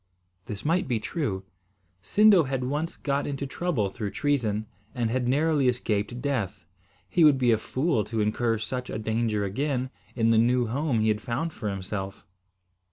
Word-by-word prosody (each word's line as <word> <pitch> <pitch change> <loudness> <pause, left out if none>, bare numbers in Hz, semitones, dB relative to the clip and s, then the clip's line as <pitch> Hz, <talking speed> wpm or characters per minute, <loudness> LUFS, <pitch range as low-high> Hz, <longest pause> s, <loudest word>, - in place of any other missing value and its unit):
This 105 +3 -6
might 170 +2 +2
be 120 -4 0
true. 105 - -3 0.6
Sindo 200 - +5
had 135 -1 -1
once 150 +6 -2
got 140 0 -1
into 140 -1 -3
trouble 135 - -1
through 105 +1 -4
treason, 110 -6 0 0.3
and 120 -2 0
had 125 0 0
narrowly 145 +1 +2
escaped 120 -1 0
death. 105 -9 -2 0.4
He 165 - +3
would 150 -3 +7
be 125 -2 +3
a 110 - +4
fool 130 -1 0
to 115 - -3
incur 115 +2 +1
such 125 +3 -4
a - - -3
danger 110 -1 0
again, 130 +5 -1 0.2
in 115 -1 +3
the 110 - +5
new 120 +2 +3
home 125 0 0
he 110 - +3
had 105 0 0
found 140 +8 -2
for 105 - -4
himself. 95 0 -5
120 Hz, 170 wpm, -27 LUFS, 110-140 Hz, 0.6 s, would